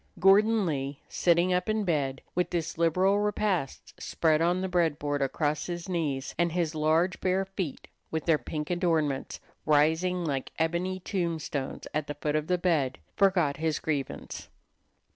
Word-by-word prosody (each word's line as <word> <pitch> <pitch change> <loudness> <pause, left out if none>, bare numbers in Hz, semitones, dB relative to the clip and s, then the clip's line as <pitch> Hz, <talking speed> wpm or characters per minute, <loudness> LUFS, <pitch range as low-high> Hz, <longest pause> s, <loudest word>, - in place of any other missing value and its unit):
Gordon 210 +3 +5
Lee, 140 -3 -2
sitting 175 +1 +2
up 180 +3 0
in 215 0 +1
bed 140 -7 -1
with 180 0 0
this 165 -2 -2
liberal 180 +5 +3
repast 205 -8 -2
spread 160 -1 +1
on 175 +2 +2
the 190 - -1
bread 170 -5 +1
board 145 -1 -2
across 150 +2 -1
his 175 -1 -5
knees, 150 -7 -2
and 170 -1 +2
his 170 -3 0
large, 160 +3 +1
bare 190 +1 +1
feet, 190 -6 -5 0.2
with 160 -1 -3
their 160 -3 +3
pink 150 +5 -4
adornments, 160 -6 0 0.2
rising 160 +4 +2
like 135 -4 -2
ebony 175 +3 -1
tombstones 165 -7 -3
at 150 0 -1
the 145 - -4
foot 150 +1 -2
of 155 0 0
the 180 - +2
bed, 155 -7 +1 0.2
forgot 180 -7 +3
his 160 0 0
grievance. 145 -4 -4
165 Hz, 160 wpm, -28 LUFS, 150-180 Hz, 0.2 s, Gordon